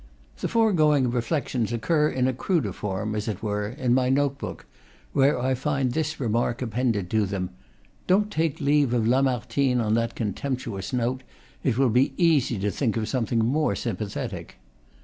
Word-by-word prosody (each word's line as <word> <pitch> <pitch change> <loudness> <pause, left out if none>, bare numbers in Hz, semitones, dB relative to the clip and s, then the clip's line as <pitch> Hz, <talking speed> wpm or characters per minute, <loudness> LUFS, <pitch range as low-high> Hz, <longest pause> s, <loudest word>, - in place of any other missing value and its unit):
The - - -1
foregoing 155 - +3
reflections 120 -2 -1
occur, 150 +6 +1
in 130 -1 0
a 130 - +1
cruder 130 - 0
form, 105 +2 -3
as 105 -1 -3
it 105 -2 -4
were, 105 -1 -1
in 125 +1 -1
my 130 0 +2
note 140 0 +1
book, - - -7 0.5
where 135 -1 +3
I 130 +2 +1
find 135 -1 0
this 155 +3 -2
remark 120 0 0
appended 115 -4 -1
to 110 -2 +2
them: 95 -2 -3 0.6
"Don't 205 +3 +3
take 160 -2 0
leave 140 -3 +2
of 115 -2 +1
Lamartine 130 0 +1
on 110 -2 +1
that 115 0 0
contemptuous 110 -2 -3
note; 125 +1 -1 0.4
it 120 -4 +1
will 135 -3 +3
be 125 +4 +2
easy 155 - +3
to 105 0 0
think 115 +2 -1
of 110 -1 -1
something 115 -1 0
more 150 +6 +1
sympathetic!" 105 -3 -4
125 Hz, 170 wpm, -25 LUFS, 110-140 Hz, 0.6 s, foregoing